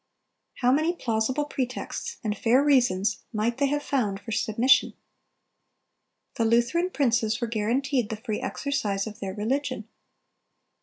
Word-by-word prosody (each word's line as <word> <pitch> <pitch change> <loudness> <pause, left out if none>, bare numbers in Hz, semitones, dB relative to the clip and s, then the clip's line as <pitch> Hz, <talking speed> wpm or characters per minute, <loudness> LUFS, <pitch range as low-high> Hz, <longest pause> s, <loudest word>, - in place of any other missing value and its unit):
How 250 0 +4
many 310 +5 +2
plausible 255 +2 0
pretexts 275 - -4
and 210 -2 -1
fair 240 +6 +3
reasons 220 -8 +2
might 230 +2 -1
they 280 - +3
have 290 +1 -1
found 215 -9 -1
for 205 +3 -9
submission! 230 +4 +3 1.4
The 230 - +2
Lutheran 235 +11 +2
princes 235 -8 +1
were 235 - 0
guaranteed 235 +2 0
the 220 - -4
free 220 0 -4
exercise 225 -7 -2
of 220 0 -8
their 195 -3 -5
religion. 250 +1 -2
235 Hz, 135 wpm, -26 LUFS, 215-275 Hz, 1.4 s, How